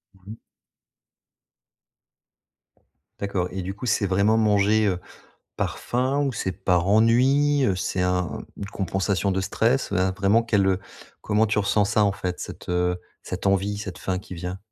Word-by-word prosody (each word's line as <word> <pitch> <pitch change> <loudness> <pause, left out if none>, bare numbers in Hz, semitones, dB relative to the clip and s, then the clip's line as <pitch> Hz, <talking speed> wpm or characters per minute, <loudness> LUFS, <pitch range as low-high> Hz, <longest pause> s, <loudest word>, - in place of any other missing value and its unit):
Mmh 95 +2 -13
mh. 115 - -9 2.8
D'accord 95 -3 -1
et 95 0 -4
du 95 +2 -4
coup, 125 +4 -7
c'est 105 - +2
vraiment 100 +4 +2
manger, 105 0 +3
heu, 90 -3 0 0.6
par - - -2
faim? 130 +4 0
Ou 135 -2 0
c'est 95 -4 -2
par 90 -2 +1
ennui, 130 +6 +4
heu? 95 - +2
C'est 90 0 -1
un 90 -1 -1
une 100 - -5
compensation 95 +1 -1
de 95 - 0
stress, 120 +7 0
un 95 +1 +2
vraiment 100 +4 +2
quel, 105 -4 +2
heu, 95 -1 +2 0.4
comment 110 +1 +2
tu 105 0 0
ressens 100 0 +2
ça 105 +1 +2
en 100 - +2
fait? 90 -2 -4
Cette, - - -8
heu, 90 0 0 0.2
cette - - -5
envie 100 +1 +1
cette 95 -3 -6
faim 95 -1 -2
qui 95 -1 -9
vient. 90 +2 -5
100 Hz, 165 wpm, -24 LUFS, 95-110 Hz, 2.8 s, ennui